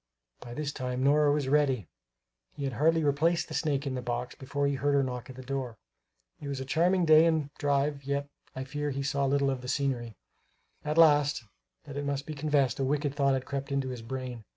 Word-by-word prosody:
By 120 -1 -9
this 150 0 -3
time 125 -1 -3
Nora 145 +1 +4
was 145 -2 0
ready; 135 - +2 0.7
he 140 - -5
had 135 -2 -2
hardly 160 +4 +3
replaced 160 +4 +2
the - - -6
snake 145 -1 0
in 135 - -2
the 130 - -3
box 120 0 -3
before 140 +1 -3
he 140 - +1
heard 140 +1 +1
her 140 - +4
knock 125 -1 -5
at 130 - -9
the 130 - -9
door. 130 -3 -4 0.6
It 145 - -7
was 140 -1 -3
a 130 - -4
charming 175 +6 +2
day 155 +1 +7
and 155 -3 0
drive, 140 0 0
yet 140 +1 -2 0.3
I 130 - -3
fear 145 +2 -3
he 140 0 -3
saw 140 0 0
little 140 0 +2
of 130 -2 -4
the 125 - -8
scenery. 125 -5 -1 0.7
Alas, 150 -4 +4 0.4
that 145 -3 -8
it 145 - -2
must 140 0 -2
be 155 - -5
confessed, 145 -3 +1
a - - +1
wicked 145 +1 0
thought 140 -2 +2
had 130 -1 -3
crept 140 0 -4
into 135 -1 -1
his 125 -2 -6
brain. 125 -1 -6
140 Hz, 220 wpm, -29 LUFS, 130-145 Hz, 0.7 s, day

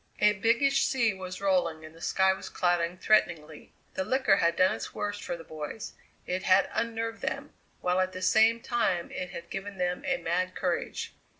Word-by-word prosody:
A 210 - +5
biggish 235 +7 +2
sea 235 -5 +2
was 185 -1 -7
rolling 175 -5 +1
and 155 - -12
the 165 - -16
sky 190 +2 +3
was 190 - -8
clouding 175 -1 0
threateningly. 165 -7 +1 0.2
The 190 - -1
liquor 255 -2 +3
had 170 -3 +2
done 185 - +4
its - - -6
worst 205 0 -3
for 175 - -4
the 165 - -10
boys: 155 +6 -7 0.3
it 180 +1 -2
had 185 +1 +4
unnerved 230 0 -2
them, - - -4 0.3
while 180 +1 +1
at 185 0 +1
the 185 0 -6
same 225 +4 +4
time 235 -9 0
it 180 - -4
had 170 - -9
given 195 0 -5
them 180 +7 -1
a 270 -1 +2
mad 185 -1 -1
courage. 180 -2 -2
185 Hz, 190 wpm, -29 LUFS, 175-220 Hz, 0.3 s, A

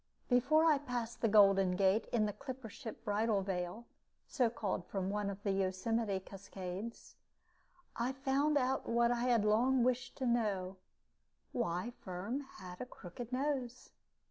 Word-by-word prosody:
Before 290 +6 +4
I 305 -3 +5
passed 245 -4 -4
the 230 - +3
Golden 195 -3 +5
Gate 195 +3 +3
in 220 -3 +2
the 210 - -2
clipper 260 -3 -7
ship 230 -2 -9
Bridal 210 -1 +1
Veil 185 +4 -3 0.4
(so 250 -5 +2
called 205 -5 -2
from 195 -1 -2
one 205 -1 -1
of 200 +1 -7
the 200 - +1
Yosemite 195 +2 0
cascades) 195 +2 -7 0.8
I 240 +2 0
found 275 +2 +1
out 265 0 0
what 235 0 +3
I 240 0 0
had 235 -4 +3
long 240 +4 +4
wished 250 0 0
to 265 - -2
know 200 -6 0 0.7
why 220 -1 -1
Firm 195 +8 -4 0.2
had 180 -1 -9
a - - -3
crooked 235 +2 -9
nose. 255 -2 -2
225 Hz, 150 wpm, -35 LUFS, 195-250 Hz, 0.8 s, I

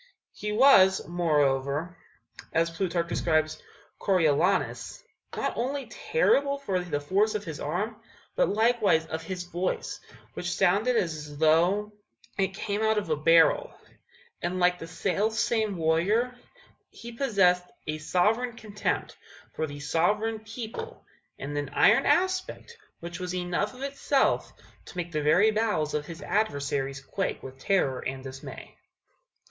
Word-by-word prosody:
He 210 - -4
was, 210 -5 +5
moreover, 150 -1 0 0.6
as 165 +1 +2
Plutarch 170 0 -1
describes 155 -2 0 0.4
Coriolanus, 180 0 +1 0.3
not - - -1
only 270 +3 -2
terrible 280 - +2
for 200 -10 -2
the 175 -5 -2
force 200 +9 +1
of 210 - -2
his 160 -6 -7
arm, 205 +9 -3 0.4
but - - +2
likewise 220 -6 +2
of 160 0 -5
his 180 +2 -5
voice, 175 +1 -3 0.3
which 175 - -4
sounded 210 +7 +2
as 150 -5 -3
though 175 +7 +3 0.4
it 195 -1 -1
came 205 +1 -2
out 220 0 +2
of 200 -6 -2
a - - +3
barrel; 165 - +4 0.7
and, 180 +2 -2
like 180 0 +3
the 165 - -7
self 200 +5 -1
same 220 -3 0
warrior, 190 +10 +1 0.5
he 235 - -10
possessed 195 -8 +2 0.2
a 155 0 -3
sovereign 215 +10 +1
contempt 215 -3 -3 0.4
for 160 - -2
the 145 0 -8
sovereign 210 +10 0
people, 230 - -8 0.3
and 145 +2 -6
an 145 -1 -2
iron - - +5
aspect 375 +5 0 0.3
which 170 +1 -7
was 180 0 -4
enough 180 +5 -2
of 260 - -8
itself 275 0 +1 0.3
to - - -12
make 175 -1 -3
the 155 -2 -1
very 170 +9 +4
bowels 210 -9 0
of 150 0 -2
his 165 -1 -8
adversaries 140 -9 -1
quake 195 +8 -3
with 130 0 -10
terror 135 -7 +1
and 130 0 -5
dismay. 135 0 -9
180 Hz, 140 wpm, -27 LUFS, 160-220 Hz, 0.7 s, was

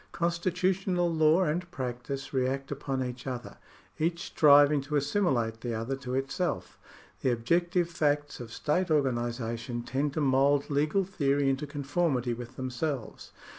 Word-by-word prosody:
Constitutional 180 +1 0
law 160 +3 +4
and 175 +2 -1
practice 130 0 -5
react 135 +1 -1
upon 135 -2 -2
each 125 +1 -6
other, 125 -2 -6 0.4
each 170 +3 0
striving 145 -2 +5
to 145 +2 -4
assimilate 135 - +1
the 120 -1 -3
other 115 +5 -2
to 130 -2 -4
it 135 +1 -1
self. 180 -5 -3 0.4
The - - +2
objective 170 +9 +1
facts 145 -3 0
of 120 -2 -8
state 175 +8 0
organisation 120 -4 -1
tend 135 +3 -1
to - - -2
mould 140 +1 +3
legal 150 +7 +2
theory 140 -7 +1
into 135 +3 -3
conformity 140 -3 0
with 120 +2 -8
themselves. 130 0 -4
140 Hz, 140 wpm, -29 LUFS, 125-165 Hz, 0.4 s, striving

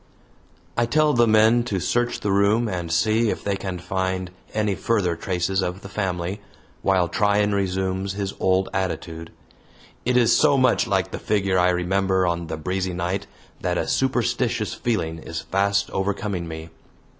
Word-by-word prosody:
I 120 0 +1
tell 155 +4 +3
the 120 -1 +4
men 110 +2 +5
to 100 -6 -1
search 120 +6 0
the 100 - 0
room 100 +4 +3
and 90 -4 -3
see 110 +6 +2
if - - -3
they 100 -1 0
can 95 -2 -4
find 95 0 -2 0.2
any 105 -2 0
further 95 -4 0
traces 95 +2 -1
of 90 +1 -3
the 100 - -8
family, 95 -1 -3 0.4
while 95 -3 +2
Tryan 105 +2 +2
resumes 95 0 -1
his 100 -1 -3
old 95 0 +2
attitude. 85 -3 -3 0.7
It 125 +1 +2
is 120 -2 +5
so 145 -2 +4
much 130 -2 +3
like 95 -3 0
the - - -5
figure 100 -3 +1
I 90 +1 +4
remember 95 +1 +1
on 85 -1 -1
the 80 - -4
breezy 90 +3 -2
night 90 +3 -2 0.3
that - - 0
a - - -1
superstitious 120 -3 0
feeling 80 -9 -2
is 80 0 -5
fast 100 +4 0
overcoming 95 -2 -2
me. 80 0 -7
95 Hz, 165 wpm, -23 LUFS, 90-110 Hz, 0.7 s, men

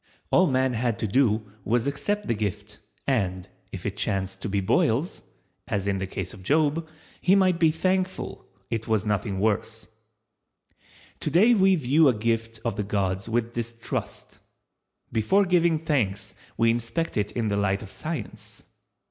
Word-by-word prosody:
All 185 - +5
man 130 -2 +2
had 120 -1 0
to 115 - -2
do 110 -1 +2 0.2
was 115 +3 +1
to 140 - 0
accept 205 +9 -2
the - - +1
gift, 105 -1 -4 0.3
and, 95 -9 0 0.2
if - - -7
it - - -3
chanced 95 0 -1
to 110 - -3
be 100 0 0
boils, 115 - +1 0.5
as 100 -1 -1
in 100 -1 0
the 95 - -3
case - - -5
of 100 - -12
Job, 155 - +1 0.3
he 185 +2 +5
might 185 -3 +3
be 165 -1 +5
thankful 185 +3 -1 0.2
it 115 -1 -2
was 110 -2 +1
nothing 105 -2 -1
worse. 110 +1 -1 1.3
Today 180 - +4
we 190 -3 +5
view 150 +1 +4
a 130 - +4
gift 115 +1 -1
of 115 -3 -1
the 105 - 0
gods 100 0 -1
with 115 0 -1
distrust. 115 -1 -5 0.7
Before 155 - +3
giving 170 -3 +3
thanks 105 -11 -1 0.2
we 115 0 +4
inspect 120 +8 -2
it 105 -1 0
in 115 -3 -1
the 100 - 0
light 100 0 0
of 95 - -10
Science. 155 -9 -6
115 Hz, 165 wpm, -26 LUFS, 105-155 Hz, 1.3 s, All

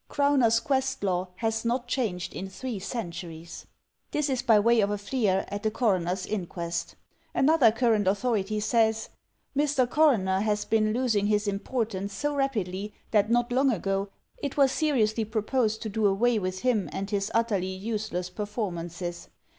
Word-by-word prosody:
Crowner's 275 -6 +3
quest 265 -1 -1
law 185 -1 0
has 225 +2 -1
not 240 +1 -1
changed 215 -9 -2
in 190 +1 -5
three 230 +2 -5
centuries." 175 -5 -6 0.4
This 300 -2 0
is 255 - 0
by 220 -3 +5
way 230 +2 +4
of 200 - +1
a 205 - -1
fleer 205 -2 0
at 205 0 -4
the 220 - +1
Coroner's 185 -5 0
Inquest. 170 -4 -4 0.4
Another 280 -5 +5
current 225 -3 +2
authority 210 0 0
says, 220 0 +1 0.5
"Mr. 285 -3 +2
Coroner 235 -10 +3
has 210 0 0
been 215 -1 +2
losing 225 -4 +1
his 210 0 +1
importance 200 -1 -2
so 290 +7 -1
rapidly 210 -7 -2 0.2
that 210 -1 +3
not 240 +1 +2
long 265 +2 +3
ago 195 -1 -1 0.3
it 285 -1 -4
was 275 -2 +5
seriously 235 -9 +1
proposed 220 +1 0
to 220 - -3
do 215 0 +1
away 220 +4 +2
with 185 -1 -3
him 240 -6 +1
and 195 +1 -4
his 200 0 0
utterly 215 -5 +1
use 215 +3 -4
less 180 +1 -3
performances. 175 -5 -4
215 Hz, 160 wpm, -27 LUFS, 195-240 Hz, 0.5 s, by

